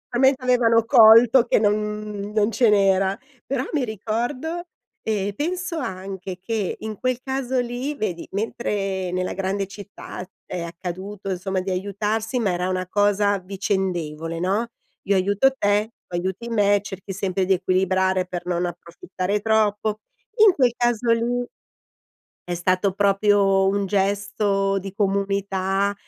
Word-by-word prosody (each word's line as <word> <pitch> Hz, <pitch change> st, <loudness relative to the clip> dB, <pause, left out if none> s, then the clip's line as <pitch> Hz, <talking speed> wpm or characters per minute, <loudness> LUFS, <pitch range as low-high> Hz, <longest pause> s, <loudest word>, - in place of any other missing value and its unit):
finalmente 265 Hz, +1 st, +3 dB
avevano 230 Hz, -3 st, +3 dB
colto 230 Hz, +1 st, +7 dB
che -, -, +3 dB
non 205 Hz, -1 st, +3 dB
mhmm, 210 Hz, -1 st, -4 dB
non 215 Hz, 0 st, +2 dB
ce 230 Hz, +1 st, +3 dB
n'era. 195 Hz, -1 st, +3 dB, 0.3 s
Però 265 Hz, -1 st, -2 dB
mi 295 Hz, -4 st, +1 dB
ricordo 240 Hz, -, -3 dB, 0.4 s
ehm, 205 Hz, -2 st, -1 dB
penso 350 Hz, -, -2 dB
anche 190 Hz, -, -5 dB
che 205 Hz, 0 st, -2 dB
in 215 Hz, -1 st, -6 dB
quel 255 Hz, -1 st, 0 dB
caso 265 Hz, -1 st, -1 dB
lì 245 Hz, +4 st, -3 dB
vedi 180 Hz, -8 st, -3 dB
mentre 195 Hz, -3 st, -2 dB
nella 185 Hz, 0 st, -2 dB
grande 195 Hz, +1 st, -2 dB
città 200 Hz, -2 st, -9 dB, 0.2 s
è 180 Hz, -, -5 dB
accaduto, 185 Hz, +4 st, -6 dB
insomma, 190 Hz, +1 st, -2 dB
di 190 Hz, +1 st, -3 dB
aiutarsi 210 Hz, +5 st, -2 dB
ma 210 Hz, -5 st, +1 dB
era 180 Hz, +1 st, -1 dB
una 185 Hz, -1 st, -2 dB
cosa 205 Hz, +1 st, +2 dB
vicendevole, 180 Hz, -4 st, -3 dB
no, 195 Hz, +6 st, 0 dB, 0.4 s
"Io 200 Hz, -, +3 dB
aiuto 200 Hz, +7 st, +3 dB
te 205 Hz, -1 st, +1 dB, 0.2 s
tu 175 Hz, -, -6 dB
aiuti 190 Hz, +6 st, -3 dB
me." 205 Hz, -3 st, +3 dB
Cerchi 195 Hz, -1 st, -8 dB
sempre 190 Hz, -1 st, -1 dB
di 190 Hz, -, +3 dB
equilibrare 185 Hz, 0 st, +1 dB
per 175 Hz, -1 st, -5 dB
non 175 Hz, 0 st, 0 dB
approfittare 180 Hz, +3 st, -4 dB
troppo, 215 Hz, -1 st, +1 dB, 0.5 s
in 400 Hz, -, +7 dB
quel 255 Hz, -7 st, +2 dB
caso 240 Hz, -1 st, +1 dB
lì 240 Hz, +2 st, +1 dB, 1.0 s
è 175 Hz, -, -4 dB
stato 185 Hz, +2 st, +1 dB
proprio 200 Hz, -1 st, +3 dB
un 200 Hz, +1 st, +1 dB
gesto 200 Hz, 0 st, 0 dB
di 195 Hz, 0 st, -8 dB
comunità 195 Hz, -1 st, 0 dB
200 Hz, 140 wpm, -23 LUFS, 190-225 Hz, 1.0 s, colto